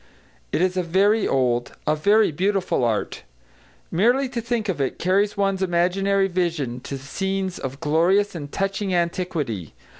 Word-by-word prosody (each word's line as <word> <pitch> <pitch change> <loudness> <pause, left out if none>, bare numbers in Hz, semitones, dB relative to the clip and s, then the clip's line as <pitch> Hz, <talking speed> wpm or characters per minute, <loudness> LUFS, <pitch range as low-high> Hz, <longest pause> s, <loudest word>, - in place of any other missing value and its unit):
It 175 - +1
is 185 0 0
a - - +3
very 195 +5 +2
old, 120 -2 0
a 155 - +2
very 205 +5 +3
beautiful 190 -3 0
art. 115 -3 -1 0.7
Merely 245 +10 +3
to 245 -2 -3
think 235 -2 -2
of 180 -7 -1
it 135 - -1
carries 200 +4 +1
one's 195 -1 0
imaginary 190 +2 +2
vision 170 -9 -2
to 135 +2 -6
scenes 190 +7 -3
of 135 +1 -5
glorious 170 +7 +2
and 145 -4 -7
touching 195 -1 -1
antiquity. 170 - -2
185 Hz, 150 wpm, -23 LUFS, 150-195 Hz, 0.7 s, a